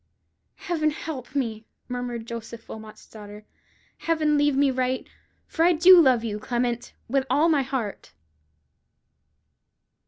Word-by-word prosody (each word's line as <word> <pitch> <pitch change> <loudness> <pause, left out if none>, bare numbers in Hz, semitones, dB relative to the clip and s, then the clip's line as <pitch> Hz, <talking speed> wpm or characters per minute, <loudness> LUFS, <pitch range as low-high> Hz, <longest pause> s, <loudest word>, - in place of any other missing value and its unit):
"Heaven 315 -3 -1
help 290 -4 -7
me!" 225 -5 -2 0.2
murmured 245 -2 -5
Joseph 230 0 -8
Wilmot's 220 -1 -11
daughter; 210 -1 -12 0.5
"Heaven 315 -2 +1
lead 290 -1 +2
me 275 0 +3
right! 255 0 -2 0.4
for 325 - -1
I 350 +1 +5
do 355 +2 +8
love 255 -6 +3
you, 210 -2 -3
Clement, 240 +1 -2
with 270 +2 0
all 315 +3 +3
my 300 -4 +3
heart." 255 -6 -4
255 Hz, 125 wpm, -25 LUFS, 230-300 Hz, 0.5 s, do